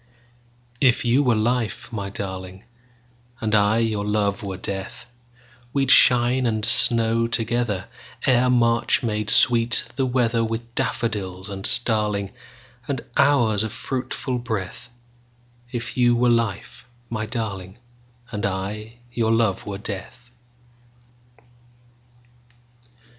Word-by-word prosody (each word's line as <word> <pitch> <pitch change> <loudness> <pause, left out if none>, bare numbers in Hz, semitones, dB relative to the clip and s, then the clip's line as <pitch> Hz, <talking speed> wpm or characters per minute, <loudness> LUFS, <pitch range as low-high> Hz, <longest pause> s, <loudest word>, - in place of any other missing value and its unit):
If 125 -3 +3
you 120 +4 +3
were 125 -5 +2
life, 115 +1 -2
my 100 -3 -4
darling, 95 0 -7 0.7
And 110 -3 -2
I 105 +1 +3
your 110 -3 0
love 105 -1 -1
were 95 -3 -5
death, 95 0 -6 0.7
We'd 135 -2 +2
shine 125 0 +5
and 110 -1 0
snow 115 0 +4
togetherEre 120 +2 -1
March 115 -1 +2
made 105 -2 -2
sweet 120 -1 +4
the 135 -1 +1
weatherWith 115 -2 0
daffodil 100 -5 -3
and 95 0 -5
starlingAnd 105 -4 -1
hours 115 -8 +3
of 110 - -4
fruitful 130 -1 -4
breath; 110 -4 -5 0.8
If 120 -1 -5
you 120 -1 +3
were 120 +1 +2
life, 115 0 -2 0.2
my 110 -1 -3
darling, 100 -5 -5 0.5
And 105 -3 -4
I 105 +4 -4 0.2
your 115 -2 0
love 115 -4 0
were 100 -1 -4
death. 120 +4 -8
115 Hz, 105 wpm, -22 LUFS, 100-120 Hz, 0.8 s, shine